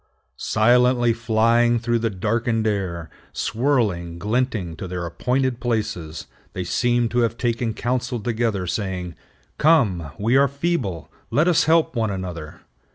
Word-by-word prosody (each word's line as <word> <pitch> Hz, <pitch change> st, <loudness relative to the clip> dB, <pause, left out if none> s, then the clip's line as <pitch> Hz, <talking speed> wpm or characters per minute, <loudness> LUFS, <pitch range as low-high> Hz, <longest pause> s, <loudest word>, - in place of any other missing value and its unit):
Silently 120 Hz, +1 st, +3 dB
flying 115 Hz, +1 st, +2 dB
through 120 Hz, 0 st, 0 dB
the 115 Hz, 0 st, 0 dB
darkened 110 Hz, +3 st, -1 dB
air, 95 Hz, -6 st, -2 dB, 0.3 s
swirling, 105 Hz, -9 st, 0 dB
glinting, 105 Hz, -3 st, -1 dB
to 95 Hz, -, -7 dB
their 90 Hz, -1 st, -4 dB
appointed 125 Hz, +8 st, -1 dB
places, 110 Hz, -10 st, -3 dB, 0.3 s
they 90 Hz, -, -3 dB
seem 120 Hz, +5 st, +1 dB
to 120 Hz, +2 st, -1 dB
have 115 Hz, -1 st, +1 dB
taken 115 Hz, -1 st, -1 dB
counsel 125 Hz, +2 st, -2 dB
together, 110 Hz, -3 st, -1 dB
saying, 90 Hz, -2 st, -3 dB, 0.5 s
"Come, 110 Hz, -, +3 dB
we 115 Hz, +5 st, +1 dB
are 140 Hz, 0 st, +5 dB
feeble; 140 Hz, -, -2 dB, 0.2 s
let 155 Hz, +4 st, +2 dB
us 175 Hz, -3 st, +3 dB
help 165 Hz, -1 st, +3 dB
one 115 Hz, -2 st, 0 dB
another. 90 Hz, -5 st, -6 dB
115 Hz, 135 wpm, -22 LUFS, 95-125 Hz, 0.5 s, are